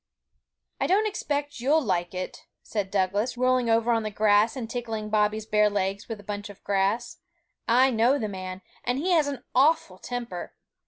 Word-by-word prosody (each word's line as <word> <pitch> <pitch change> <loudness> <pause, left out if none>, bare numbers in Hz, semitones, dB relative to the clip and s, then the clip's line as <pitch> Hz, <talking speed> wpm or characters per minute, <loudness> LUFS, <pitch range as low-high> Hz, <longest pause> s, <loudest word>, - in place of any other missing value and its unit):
'I - - +1
don't 405 +4 +3
expect 290 - -3
you'll 285 +6 +3
like 175 -4 -1
it,' 185 0 -6 0.2
said 205 -3 -3
Douglas, 205 +5 0
rolling 255 -1 +2
over 230 +1 +3
on 230 -1 +2
the 215 - -3
grass 210 +1 +3
and 245 -4 -4
tickling 225 -3 -4
Bobby's 215 0 +1
bare 210 -1 +3
legs 200 +1 -2
with 225 -2 -5
a - - -12
bunch 205 +1 -5
of 200 - -13
grass; 200 +3 0 0.5
'I 255 +3 +5
know 240 +4 +3
the 220 - -2
man, 185 -1 -6 0.2
and 245 +1 0
he 350 +7 0
has 315 -4 +4
an 280 -2 -5
awful 320 +5 +3
temper! 240 -7 -6
225 Hz, 180 wpm, -26 LUFS, 205-255 Hz, 0.5 s, I